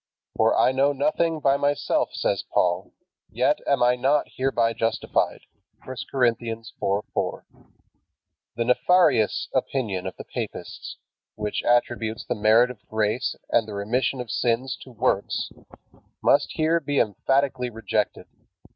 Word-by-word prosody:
"For - - +3
I - - +4
know 135 +2 +2
nothing 155 +3 0
by 140 0 +3
myself," 145 0 +1
says - - -1
Paul, 90 +1 +1 0.4
"yet - - +1
am 140 -3 +3
I 125 0 +4
not 135 +4 +2
hereby 120 -3 +1
justified." 115 0 -1 0.4
(I 130 - -7 0.2
Cor. 130 -2 +3 0.9
4:4.) - - -2 1.1
The 115 +1 -1
nefarious 130 - +3
opinion 100 -9 -1
of 95 - -6
the - - -7
papists, - - -6 0.4
which 105 -1 -2
attributes 120 -2 +1
the - - -1
merit 110 +4 +4
of 110 -5 -14
grace 110 +3 0 0.2
and 115 -2 +3
the 105 - -6
remission 120 +6 -1
of 125 -3 -5
sins 125 +2 0
to 130 - -12
works, 105 -3 -1 0.7
must - - +3
here 160 +2 +2
be 145 -2 -2
emphatically 130 +4 +1
rejected. 115 -1 -2
125 Hz, 130 wpm, -24 LUFS, 110-135 Hz, 1.1 s, I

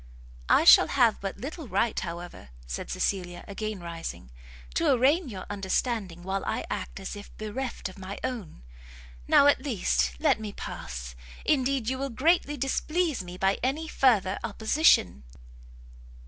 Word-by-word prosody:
"I - - +5
shall - - +8
have 240 -5 +3
but 195 -1 -4
little 300 +2 -7
right, 230 +1 +1
however," 170 - -7 0.2
said - - -5
Cecilia, 180 -3 -2
again 210 -1 -4
rising, 165 - -7 0.4
"to - - +2
arraign 275 +5 +3
your 190 -4 -7
understanding 195 -2 -2
while 190 +1 -2
I - - -2
act 60 0 -4
as - - -6
if 205 0 -10
bereft 225 +4 -4
of 190 +1 -12
my 190 +2 -6
own. 220 - -5 0.6
Now, - - +6
at 285 - +5
least, 65 - 0
let - - +3
me 215 -2 -6
pass; - - -7 0.3
indeed 270 -4 +1
you 260 +1 -1
will 275 0 -2
greatly 295 +3 +2
displease 305 - 0
me 180 0 -9
by 195 +1 +1
any 285 +6 -1
further 220 -10 +2
opposition." 215 - +3
210 Hz, 145 wpm, -27 LUFS, 180-265 Hz, 0.6 s, shall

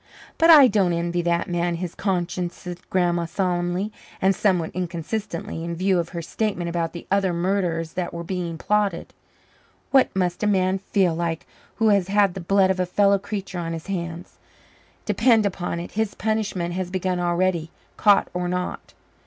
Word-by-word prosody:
"But 330 +1 +5
I 295 -5 +10
don't 195 -6 +2
envy 170 +1 -1
that 170 0 0
man 175 0 0
his 175 0 -5
conscience," 180 -2 -2
said 175 -1 -9
Grandma 175 -2 +1
solemnly 180 +2 -1 0.3
and 190 +1 +3
somewhat 180 -6 +1
inconsistently, 170 0 -4
in 170 0 -4
view 185 +1 +2
of 170 -1 -2
her 170 -2 -5
statement 195 -1 -2
about 170 -1 -2
the 170 - -8
other 195 -2 +2
murders 170 -2 -1
that 180 -1 -3
were 170 0 -6
being 170 -2 -4
plotted. 205 -2 0 0.8
"What 270 -2 +5
must 180 -2 0
a 210 - +1
man 190 -1 +2
feel 190 -3 +1
like 165 -1 -2 0.3
who 225 -1 +3
has 200 -3 +3
the 195 -2 +2
blood 190 +2 +3
of 190 - -2
a 180 - +1
fellow 200 +2 +3
creature 195 -2 -5
on 165 -1 -3
his 165 -1 -6
hands? 170 -3 -5 0.7
Depend 225 +1 +3
upon 175 -3 -2
it, 170 - -7
his 220 -1 -1
punishment 210 -6 -1
has 185 0 -3
begun 185 -1 -1
already, 175 -1 0 0.3
caught 205 -2 +4
or 180 0 -2
not." 180 0 -4
180 Hz, 170 wpm, -23 LUFS, 170-195 Hz, 0.8 s, I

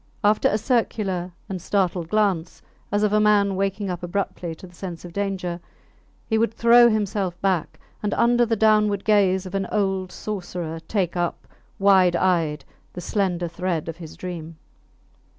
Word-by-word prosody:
After 210 +1 +4
a 210 - +1
circular 200 -7 -1 0.2
and 185 -2 -5
startled 180 -3 0
glance, 195 -5 0 0.3
as 205 0 +1
of 210 -1 +2
a 215 - +4
man 205 -2 +3
waking 195 0 -1
up 175 - -5
abruptly 175 -2 -3
to 175 - -12
the 180 - -15
sense 175 -1 -7
of 175 - -10
danger, 190 -3 -2 0.7
he 220 -1 +1
would 230 -1 0
throw 235 +1 +6
himself 200 -4 -1
back, 185 -5 -1 0.2
and 210 - -1
under 240 +1 +4
the 230 -1 +1
downward 210 -2 +3
gaze 195 -3 +3
of 185 - -7
the 195 0 -3
old 195 -3 0
sorcerer 175 -5 -5
take 190 -5 -1
up, 175 -1 -2 0.3
wide 190 -3 +5
eyed, 165 -5 +1 0.3
the - - -7
slender 180 -2 -1
thread 170 -1 -3
of 165 0 -5
his 165 -3 -10
dream. 165 -3 -7
190 Hz, 165 wpm, -23 LUFS, 175-210 Hz, 0.7 s, throw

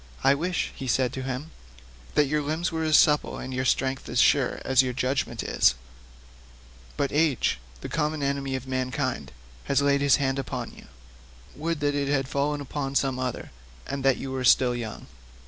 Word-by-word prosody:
"I 135 - +6
wish," 175 +5 -1
he 135 - -6
said 125 +1 +1
to 130 - -4
him, 135 +4 -5 0.6
"that 150 - +5
your 150 +2 0
limbs 155 +4 -1
were 160 0 -2
as 155 -1 +5
supple 150 -1 +3
and 130 - -6
your 130 0 -1
strength 130 +2 0
as 120 - -3
sure 135 -2 +3
as 130 0 +5
your 130 -1 -2
judgment 125 -3 -1
is; - - +3 1.2
but 140 - 0
age, 150 - +1 0.2
the - - -5
common 150 -1 -1
enemy 140 -1 -1
of 130 -1 -5
mankind, 130 - -2 0.3
has 140 - +2
laid 140 0 +2
his 140 -1 +5
hand 135 -1 0
upon 125 -3 -5
you; - - -15 0.7
would 160 0 -3
that 145 0 +1
it 140 -1 -1
had 135 -2 +1
fallen 145 +2 -1
upon 140 0 -4
some 135 -2 +1
other, 130 -2 -4 0.3
and 140 -1 -4
that 135 -1 +4
you 135 - -5
were 130 -1 -3
still 125 0 +5
young." 115 -3 -6
135 Hz, 185 wpm, -26 LUFS, 130-145 Hz, 1.2 s, I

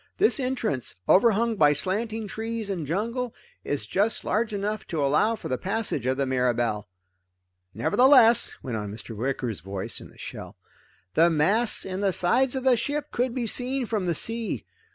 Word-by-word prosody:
This 410 -5 +3
entrance, 245 - -2
overhung 225 +2 +4
by 150 -4 +5
slanting 215 +8 -2
trees 220 0 -4
and 170 -6 -3
jungle, 230 - -2 0.3
is 140 -7 -3
just 205 - 0
large 215 +1 0
enough 210 +1 -3
to 155 -4 -1
allow 155 +11 +2
for - - -7
the 130 - -2
passage 200 - -2
of 130 0 +1
the 140 - +1
Mirabelle. 120 -5 0 0.9
"Nevertheless," 235 - +5
went 120 -4 -3
on 105 -1 -5
Mr. 110 +2 -8
Wicker's 120 -2 -2
voice 95 +3 -4
in - - -11
the - - -20
shell, - - -8 0.6
"the 165 +7 +5
masts 195 +9 +1
and 190 +1 -4
the 195 -2 +2
sides 250 +11 +2
of 260 - -2
the 260 -2 +4
ship 290 +6 -3
could 245 0 -1
be 250 -2 -1
seen 250 +3 0
from 210 -5 -2
the 170 - +1
sea. 225 +6 -3
205 Hz, 175 wpm, -26 LUFS, -, 0.9 s, by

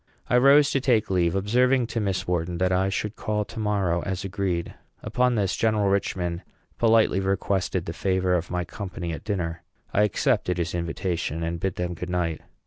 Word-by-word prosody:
I - - +4
rose 140 +2 +6
to 135 - +1
take 115 -6 +2
leave, 85 -2 +2
observing 125 +6 +2
to 115 - 0
Miss 100 -3 -1
Wharton 90 -1 -1
that 90 +1 +1
I 95 +1 +2
should 105 +2 -3
call 105 -1 -2
to 115 - -8
morrow, 100 -5 0
as 95 +1 -3
agreed. 95 -3 -2 0.3
Upon 125 -1 +1
this, 100 -4 0
General 110 -3 +2
Richman 90 -3 -1 0.4
politely 110 -4 +4
requested 95 -2 -1
the 80 - -4
favor 95 -1 0
of 85 -1 0
my 90 -1 -2
company 90 -4 -5
at - - -7
dinner. 85 -6 -3 0.3
I 105 - +3
accepted 90 -3 +1
his 85 0 -2
invitation, 85 -1 -2
and 85 +1 -2
bade 95 +1 -2
them 90 0 -2
good 90 +2 -6
night. 85 -3 -1
95 Hz, 185 wpm, -25 LUFS, 85-105 Hz, 0.4 s, rose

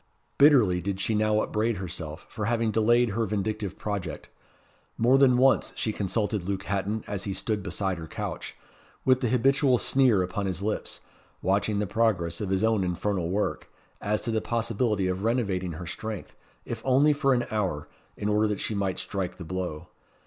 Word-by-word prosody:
Bitterly 120 -12 +6
did 95 +1 -3
she 110 - 0
now 110 0 +2
upbraid 110 +1 0
herself 85 -3 -6
for 105 - -4
having 115 0 +1
delayed 120 +2 +3
her 110 +2 -1
vindictive 105 -1 -2
project. 100 -6 -4 0.7
More 125 +4 +4
than 130 -3 +5
once 135 +1 +3
she 110 - -1
consulted 105 +1 -1
Luke 95 +1 -3
Hatton 100 +2 -2
as 100 -1 -4
he 100 - -2
stood 105 +2 -1
beside 95 -1 -2
her 80 - -7
couch, - - -5 0.5
with 130 -1 +5
the 125 - +1
habitual 130 +1 +3
sneer 125 -7 +3
upon 95 +2 -3
his 95 +1 -3
lips, 105 +1 -3 0.4
watching 100 +2 +1
the 105 - 0
progress 95 -5 0
of 100 - -2
his 95 +2 +1
own 110 -3 +2
infernal 90 0 -1
work, 100 +3 -2 0.3
as 105 +1 -1
to 115 - -1
the 110 -1 0
possibility 115 -3 0
of 95 +1 -1
renovating 100 -7 0
her 85 +3 -7
strength, 105 +4 -6 0.3
if - - -5
only 135 +3 +4
for 140 -2 +2
an 120 - 0
hour, 95 -9 -1 0.3
in 105 - -2
order 105 +1 +3
that 105 -2 -2
she - - -2
might 100 -3 -1
strike 95 -3 -4
the 90 - -8
blow. 90 -3 -4
105 Hz, 180 wpm, -27 LUFS, 95-115 Hz, 0.7 s, Bitterly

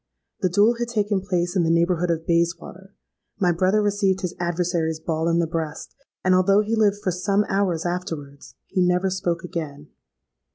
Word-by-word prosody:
The 185 - +1
duel 210 +6 +3
had 240 - -1
taken 210 -4 0
place 180 -1 -1
in 180 - +3
the 165 - +1
neighbourhood 170 +1 +2
of 165 -1 -1
Bayswater: 170 +3 -2 0.4
my 180 -3 +3
brother 185 +5 +2
received 200 -2 +1
his 180 -2 -3
adversary's 170 -2 -1
ball 160 0 -2
in 170 0 +2
the 170 - +2
breast; 160 -1 -5 0.3
and 185 - +3
although 195 +3 +4
he 215 +2 -1
lived 210 -2 +3
for 185 - +1
some 200 +3 0
hours 190 -4 0
afterwards, 160 -6 -5
he 185 - -1
never 180 +1 +2
spoke 175 -3 -2
again. 150 -4 -6
180 Hz, 175 wpm, -23 LUFS, 170-195 Hz, 0.4 s, although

